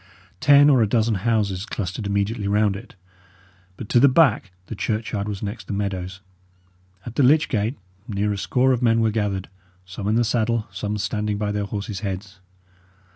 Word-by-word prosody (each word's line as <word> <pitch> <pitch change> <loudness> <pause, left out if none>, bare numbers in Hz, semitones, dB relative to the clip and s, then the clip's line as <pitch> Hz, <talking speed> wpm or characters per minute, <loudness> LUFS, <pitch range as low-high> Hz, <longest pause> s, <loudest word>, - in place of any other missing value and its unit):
Ten 145 +3 +6
or 130 -4 +4
a 110 - +3
dozen 115 0 +2 0.2
houses 100 -4 0
clustered 100 -1 -4
immediately 100 +1 -1
round 105 0 +2
it; 105 +2 -11 0.8
but 110 - -7
to 120 - +4
the 140 +3 +6
back 130 -8 +3 0.2
the 115 - -7
churchyard 105 -1 -2
was 100 0 -5
next 105 -1 -6
the - - -4
meadows. 95 -1 -4 0.8
At 120 - -7
the - - +4
lych 150 +4 +4
gate, 110 +4 -1 0.3
near 105 -1 -1
a - - -4
score 130 +6 +2
of 125 - -1
men 115 -2 +3
were 110 -1 +2
gathered, 100 -3 -2 0.4
some 95 +2 -6
in 110 - +2
the 120 - +3
saddle, 115 -1 0
some 105 +2 -3
standing 105 0 -2
by 105 0 -2
their 105 0 -2
horses' 100 0 -5
heads. 95 -1 -6
105 Hz, 180 wpm, -23 LUFS, 100-115 Hz, 0.8 s, Ten